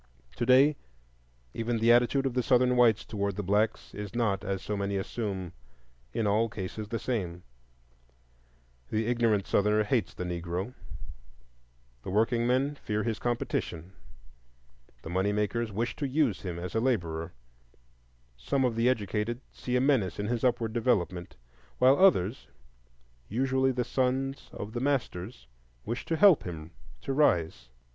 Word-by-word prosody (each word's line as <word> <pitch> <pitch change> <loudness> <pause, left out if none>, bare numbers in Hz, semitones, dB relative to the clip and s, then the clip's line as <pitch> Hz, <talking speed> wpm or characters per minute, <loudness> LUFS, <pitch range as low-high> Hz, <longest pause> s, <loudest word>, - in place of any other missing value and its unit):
Today 130 +4 +4 0.8
even 115 +1 -1
the 115 +1 +4
attitude 125 +3 +3
of 135 - 0
the 125 - +1
Southern 125 +1 +3
whites 115 -4 +4
toward 100 -2 -2
the 105 - -3
blacks 105 +4 0
is 105 +1 -7
not, 105 -5 0
as 95 -2 -3
so 105 - -3
many 100 0 -1
assume, 95 -3 -4 0.6
in 110 - -1
all 110 +3 +2
cases 105 +1 -6
the 115 +2 -3
same; 90 -9 -3 1.5
the 110 +1 0
ignorant 115 -4 +1
Southerner 105 +1 +2
hates 110 +1 -1
the - - -4
Negro, 90 +5 -4 1.3
the - - -7
workingmen 120 +6 +2
fear 105 -1 -1
his 115 -2 -2
competition, 95 -7 -3 1.1
the - - -7
money 95 +3 +1
makers 105 +2 -1
wish 115 +4 -2
to 145 - -1
use 135 -6 +1
him 90 -3 -5
as 90 0 -6
a 110 - +1
laborer, 85 -10 -1 1.0
some 135 - 0
of 120 -3 0
the 115 +2 +3
educated 110 0 -1
see 125 - -4
a 125 - +3
menace 125 - +2
in 105 - -2
his 120 +1 -2
upward 120 -3 +1
development, 95 -7 0 0.4
while 130 +2 +5
others—usually 70 - 0
the 125 -1 -1
sons 130 +2 -1
of 105 +2 -7
the 120 - -2
masters—wish 90 - -4
to 165 - -1
help 190 -2 +7
him 80 -2 -7 0.3
to 135 - -2
rise. 85 - +1
110 Hz, 140 wpm, -29 LUFS, 95-125 Hz, 1.5 s, help